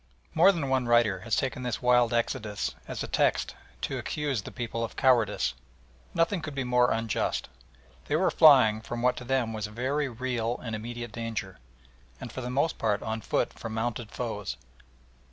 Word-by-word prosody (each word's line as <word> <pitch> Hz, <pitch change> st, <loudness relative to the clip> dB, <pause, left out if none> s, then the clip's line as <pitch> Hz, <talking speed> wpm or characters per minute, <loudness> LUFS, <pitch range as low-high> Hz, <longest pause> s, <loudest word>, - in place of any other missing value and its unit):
More 195 Hz, -, +7 dB
than 165 Hz, -7 st, -2 dB
one 130 Hz, -2 st, +1 dB
writer 120 Hz, -5 st, +4 dB
has 110 Hz, +4 st, -1 dB
taken 130 Hz, -2 st, -1 dB
this 125 Hz, -3 st, -2 dB
wild 125 Hz, -1 st, +4 dB
exodus 115 Hz, -3 st, -1 dB
as -, -, -4 dB
a -, -, -4 dB
text -, -, +1 dB, 0.3 s
to -, -, -2 dB
accuse 145 Hz, -7 st, -2 dB
the -, -, -9 dB
people 115 Hz, -1 st, -3 dB
of 115 Hz, -, -5 dB
cowardice. 125 Hz, -5 st, +3 dB, 0.6 s
Nothing 165 Hz, +2 st, +2 dB
could 150 Hz, -3 st, -6 dB
be 135 Hz, -, -1 dB
more 125 Hz, 0 st, +3 dB
unjust. 115 Hz, -1 st, -1 dB, 0.6 s
They 145 Hz, -, 0 dB
were 185 Hz, +4 st, +3 dB
flying 130 Hz, -8 st, +6 dB
from 120 Hz, +1 st, -5 dB
what 125 Hz, 0 st, +3 dB
to -, -, -6 dB
them 125 Hz, -3 st, 0 dB
was 110 Hz, -1 st, -3 dB
a -, -, -13 dB
very 135 Hz, +5 st, -1 dB
real 120 Hz, -1 st, -2 dB
and 115 Hz, -3 st, -3 dB
immediate 120 Hz, +1 st, -6 dB
danger, 110 Hz, -4 st, -5 dB, 0.6 s
and 120 Hz, -, -7 dB
for 130 Hz, -, -6 dB
the 125 Hz, -, -4 dB
most 140 Hz, +5 st, 0 dB
part 105 Hz, -2 st, 0 dB
on 110 Hz, 0 st, -3 dB
foot -, -, 0 dB
from 110 Hz, -1 st, -6 dB
mounted 115 Hz, 0 st, -2 dB
foes. 105 Hz, -, -4 dB
120 Hz, 185 wpm, -28 LUFS, 110-130 Hz, 0.6 s, More